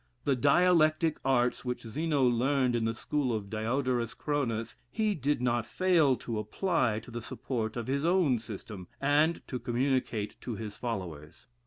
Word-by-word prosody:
The 140 - +2
dialectic 155 +2 +3
arts 125 -2 +2
which 125 -1 -3
Zeno 145 +5 0
learned 125 +1 +2
in 115 -1 0
the 115 0 -1
school 140 +2 -1
of 105 -3 -3
Diodorus 120 +1 -1
Chronus, 120 -7 -2
he 215 - 0
did 145 -5 -1
not 120 -1 +1
fail 165 -5 +3
to 115 -3 -4
apply 125 - 0
to 120 - -13
the 120 0 -5
support 115 -1 -4
of 120 - -3
his 140 +3 -1
own 165 -8 +3
system, 105 -4 -8
and 150 +4 +2
to 125 - -4
communicate 120 -4 -1
to 120 - -4
bis 110 -2 -6
followers. 85 - -6
125 Hz, 160 wpm, -30 LUFS, 115-145 Hz, -, dialectic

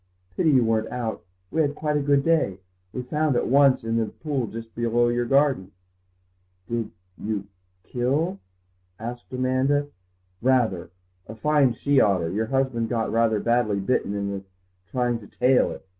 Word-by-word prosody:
"Pity 160 - +2
you 130 -4 +5
weren't 110 0 +1
out; 120 -3 -4 0.3
we 160 - +2
had 145 -1 0
quite 150 -1 -1
a 145 - +2
good 140 0 +3
day. 155 - +2 0.3
We 125 - -4
found 150 +2 0
at - - +1
once, 135 -1 +4
in 115 0 -1
the 115 -1 +1
pool 140 -4 -3
just 115 +1 -8
below 120 0 +1
your 120 0 0
garden." 135 -8 +2 0.9
"Did 115 -2 -2 0.3
you—kill?" 105 - -3 0.6
asked 120 +3 -7
Amanda. 130 +3 +1 0.5
"Rather. 115 -9 +1 0.4
A 110 - -8
fine 140 +1 +3
she 140 +3 +2
otter. 90 -5 +2
Your 110 +4 -1
husband 130 -3 0
got 115 -1 -1
rather 115 -1 +2
badly 115 -3 +1
bitten 100 0 0
in 100 -1 -3 0.5
trying 120 -2 0
to 105 - -13
'tail 125 +1 +3
it. - - -9
120 Hz, 155 wpm, -24 LUFS, 110-135 Hz, 0.9 s, you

